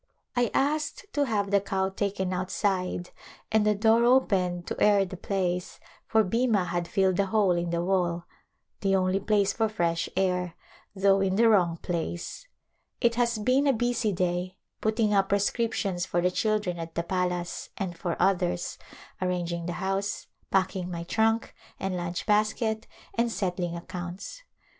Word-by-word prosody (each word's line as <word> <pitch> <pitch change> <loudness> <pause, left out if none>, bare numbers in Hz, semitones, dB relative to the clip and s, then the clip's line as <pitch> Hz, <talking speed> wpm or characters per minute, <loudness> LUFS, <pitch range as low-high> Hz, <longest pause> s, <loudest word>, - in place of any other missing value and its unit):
I 245 -2 +2
asked 300 +7 0
to 290 -1 +2
have 205 -5 -1
the 200 -1 +4
cow 190 -1 -1
taken 195 -1 -2
outside 185 -1 -1 0.4
and 220 -1 +4
the 210 - +4
door 225 +3 +4
opened 190 -9 +2
to - - -5
air 205 -2 +5
the 185 - -7
place 180 -1 -2 0.3
for 220 -1 +4
Bhima 220 -1 +2
had 175 0 -2
filled 190 0 +2
the 200 - +2
hole 205 -1 +3
in 175 0 0
the 170 0 0
wall, 175 -2 0 0.5
the 195 -1 +2
only 185 0 +2
place 200 -1 +2
for 225 -1 +1
fresh 170 -5 0
air, 180 -2 0 0.4
though 195 0 +4
in 190 -1 +1
the 230 +3 +5
wrong 180 -6 +4
place. 175 - -4 0.5
It 235 -2 +3
has 235 -1 +1
been 255 +6 +2
a 275 - +5
busv 235 -3 0
day, 180 +1 -1 0.2
putting 215 -1 +1
up 195 -1 +3
prescrip 210 +3 +1
tions 180 -3 -1
for 175 - 0
the 180 +1 +2
children 210 -3 0
at 165 0 -7
the 170 - 0
palace 180 -1 -2
and 185 -3 -3
for 170 0 -2
others, 180 -1 +1 0.4
ar 185 - +1
ranging 170 -1 -2
the 175 - -2
house, 195 +2 -2 0.2
packing 185 -1 +1
mv 170 -1 -6
trunk 225 +1 +1 0.3
and 190 -1 -2
lunch 175 -1 -3
basket 215 +1 +1 0.3
and 235 0 +1
settling 180 -4 -2
accounts. 180 - -7
190 Hz, 165 wpm, -27 LUFS, 180-215 Hz, 0.5 s, air